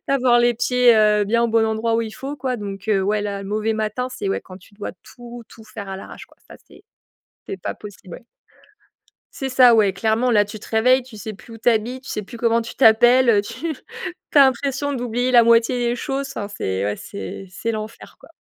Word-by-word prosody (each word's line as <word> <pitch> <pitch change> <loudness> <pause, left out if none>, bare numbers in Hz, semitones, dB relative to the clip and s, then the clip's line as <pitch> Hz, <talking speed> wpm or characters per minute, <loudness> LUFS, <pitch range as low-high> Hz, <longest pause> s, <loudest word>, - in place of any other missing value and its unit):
d'avoir 255 -3 +3
les 240 0 +3
pieds, 245 0 +3
heu, 210 -1 +4
bien 235 +3 +1
au 235 - +1
bon 225 0 +2
endroit 220 +1 -1
où - - +1
il 220 -1 -5
faut 275 +2 -6
quoi 260 -3 -3
donc 200 -1 -7
heu, 195 -3 +2
ouais, 210 +2 0
là, 200 -1 -4
mauvais 215 +2 -1
matin, 220 +3 -2
c'est, 200 -5 -4
ouais, - - -1
quand 185 - -13
tu 190 +3 -19
dois 205 0 -7
tout 240 -1 -11
tout 220 - -15
faire 215 -2 -9
à 190 - -5
l'arrache, - - -11
quoi, - - -26
ça - - -12
c'est - - -18 0.6
c'est 190 - -6
pas - - -4
possible, 190 -4 -12
ouais. 235 - -12 1.1
C'est 270 - -4
ça, 255 -2 +6
ouais, 205 -4 +3
clairement 220 +5 0
là, 210 -3 +4
tu 205 +1 -9
te - - -13
réveilles, 250 +3 +3
tu 250 -3 -14
sais 215 +1 -7
plus 225 +3 -14
où - - -10
tu 230 - +2
habites, 240 +3 -1
tu - - -11
sais 210 - -3
plus 235 +4 -11
comment 230 0 +2
tu 230 - -9
t'appelles, 240 +1 +5
heu, 205 -3 +4
tu 255 +10 -5 0.6
tu 300 - +4
as - - +9
l'impression 275 +2 +1
d'oublier 245 -1 -2
la 240 -1 +7
moitié 230 +2 +3
des 240 - -1
choses, 275 +2 -3
enfin 205 -1 -5
c'est, 95 - -3
ouais, 105 0 -2
c'est 100 - -8
c'est 230 +5 -4
l'enfer, 215 0 -8
quoi. - - -16
225 Hz, 235 wpm, -21 LUFS, 210-245 Hz, 1.1 s, as